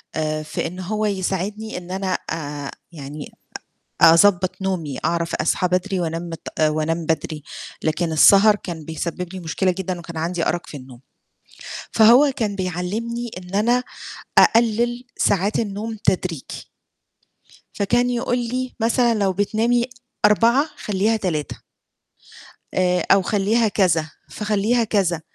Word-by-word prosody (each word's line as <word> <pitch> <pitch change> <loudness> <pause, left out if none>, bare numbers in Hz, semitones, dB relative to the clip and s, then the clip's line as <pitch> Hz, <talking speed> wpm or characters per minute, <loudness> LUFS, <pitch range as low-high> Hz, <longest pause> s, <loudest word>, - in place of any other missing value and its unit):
آآ 155 -1 -1
في 155 - -3
إن 180 +2 -8
هو 215 +4 -2
يساعدني 200 +2 -2
إن 180 0 -8
أنا 190 -1 -1
آآ 145 -3 -5 0.2
يعني 145 -1 -8 0.7
أ 165 -1 +9
أضبّط 185 +1 +3
نومي، 165 -8 -2
أعرف 170 0 0
أصحى 170 +3 +1
بدري 185 +1 0
وأنام 165 0 -2
متأ 155 -1 -1
وانام 155 +2 -1
بدري، 155 -1 -2 0.4
لكن 160 +1 -1
السهر 200 +6 +6
كان 165 -6 -7
بيسبب 170 +2 -4
لي 185 - -6
مشكلة 185 +3 0
جدًا 185 -1 -3
وكان 170 -1 -9
عندي 165 +1 -2
أرَق 175 - -2
في 150 - -9
النوم، 130 -2 -12 0.9
فهو 245 +6 +6
كان 205 -3 -1
بيعلّمني 210 +7 -3
إن 180 +1 -11
أنا 240 +4 +2 0.6
أقلِّل 235 +2 +3
ساعات 200 +2 +1
النوم 220 +1 -3
تدريجي 180 -5 -2 1.1
فكان 240 +5 +1
يقول 245 0 0
لي 250 +1 -3
مثلًا 235 +1 +2
لو 195 -3 +1
بتنامي 225 +5 +1 0.4
04:00 235 +7 +4
خلّيها 210 +1 0
03:00 160 -8 -3 1.1
آآ 180 -1 +1
أو 195 0 +6
خلّيها 215 +4 +1
كذا، 165 -6 +1 0.2
فاخلّيها 215 +3 0
كذا، 185 -7 0
190 Hz, 130 wpm, -21 LUFS, 165-220 Hz, 1.1 s, أ